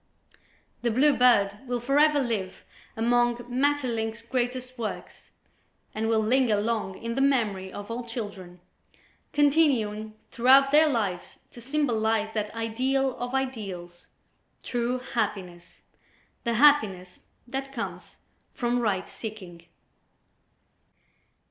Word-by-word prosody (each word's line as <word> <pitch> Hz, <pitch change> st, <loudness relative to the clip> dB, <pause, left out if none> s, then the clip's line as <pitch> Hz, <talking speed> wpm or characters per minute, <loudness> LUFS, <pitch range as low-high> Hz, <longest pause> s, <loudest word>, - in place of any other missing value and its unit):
"The 240 Hz, -, +1 dB
Blue 275 Hz, +6 st, +3 dB
Bird" 205 Hz, -5 st, +4 dB
will 245 Hz, 0 st, -1 dB
forever 290 Hz, +4 st, +3 dB
live 220 Hz, -8 st, -3 dB, 0.3 s
among 240 Hz, +1 st, +2 dB
Maeterlinck's 245 Hz, -4 st, -1 dB
greatest 255 Hz, +1 st, -3 dB
works 230 Hz, -4 st, -7 dB, 0.6 s
and 220 Hz, +1 st, -2 dB
will 220 Hz, -1 st, +3 dB
linger 235 Hz, -2 st, +2 dB
long 210 Hz, -3 st, -2 dB
in 230 Hz, 0 st, -4 dB
the 270 Hz, -, -1 dB
memory 215 Hz, -9 st, +1 dB
of 205 Hz, +2 st, -8 dB
all 240 Hz, +2 st, -4 dB
children, 205 Hz, -7 st, -7 dB, 0.7 s
continuing 260 Hz, -8 st, +2 dB, 0.2 s
throughout 270 Hz, +3 st, +5 dB
their 305 Hz, +1 st, +6 dB
lives 205 Hz, -9 st, -2 dB
to 240 Hz, -, -12 dB
symbolize 225 Hz, -5 st, 0 dB
that 210 Hz, -1 st, -3 dB
ideal 255 Hz, +4 st, 0 dB
of 245 Hz, +2 st, -4 dB
ideals, 195 Hz, -10 st, -5 dB, 0.6 s
true 245 Hz, 0 st, -1 dB
happiness, 195 Hz, -8 st, -4 dB, 0.6 s
the 235 Hz, 0 st, 0 dB
happiness 215 Hz, -10 st, +3 dB, 0.3 s
that 270 Hz, +2 st, -5 dB
comes 235 Hz, -4 st, -6 dB, 0.4 s
from 245 Hz, 0 st, 0 dB
right 200 Hz, -5 st, -1 dB
seeking. 185 Hz, -7 st, -9 dB
235 Hz, 110 wpm, -26 LUFS, 210-260 Hz, 0.7 s, their